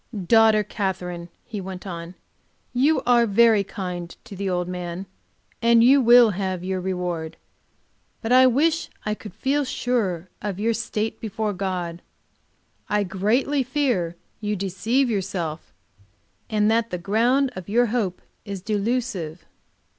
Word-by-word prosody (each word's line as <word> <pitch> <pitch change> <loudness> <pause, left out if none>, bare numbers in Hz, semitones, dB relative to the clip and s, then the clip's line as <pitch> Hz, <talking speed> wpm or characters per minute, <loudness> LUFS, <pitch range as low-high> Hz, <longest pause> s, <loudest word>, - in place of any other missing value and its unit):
"Daughter 220 +1 +5
Katherine," 180 -4 -4 0.2
he 210 -4 -5
went 185 0 -7
on, 170 -1 -7 0.6
"you 280 +6 +2
are 240 -1 +4
very 220 0 +5
kind 180 -4 -5
to 200 - -10
the 195 0 -2
old 180 -1 -1
man, 180 +1 -5 0.6
and 230 0 +5
you 270 +3 +6
will 240 -2 +7
have 185 -2 -3
your 185 0 -2
reward. 180 -3 -3 0.9
But 225 - -2
I 255 +1 +7
wish 310 +6 +2 0.2
I 210 - 0
could 210 -1 -9
feel 275 +6 +1
sure 220 -10 -1
of 200 -2 -4
your 230 +2 +1
state 220 -1 -3
before 215 -1 -2
God. 180 -3 -3 0.9
I 210 0 +2
greatly 215 +10 +1
fear 245 - 0 0.2
you 210 -1 -2
deceive 205 +8 0
yourself, 180 - -3 0.8
and 215 0 +2
that 230 0 +1
the 180 - -3
ground 235 +9 +2
of 185 +1 -8
your 240 +4 +4
hope 200 -7 -1 0.2
is 200 -3 -6
delusive." 210 -6 -2
205 Hz, 140 wpm, -23 LUFS, 180-235 Hz, 0.9 s, will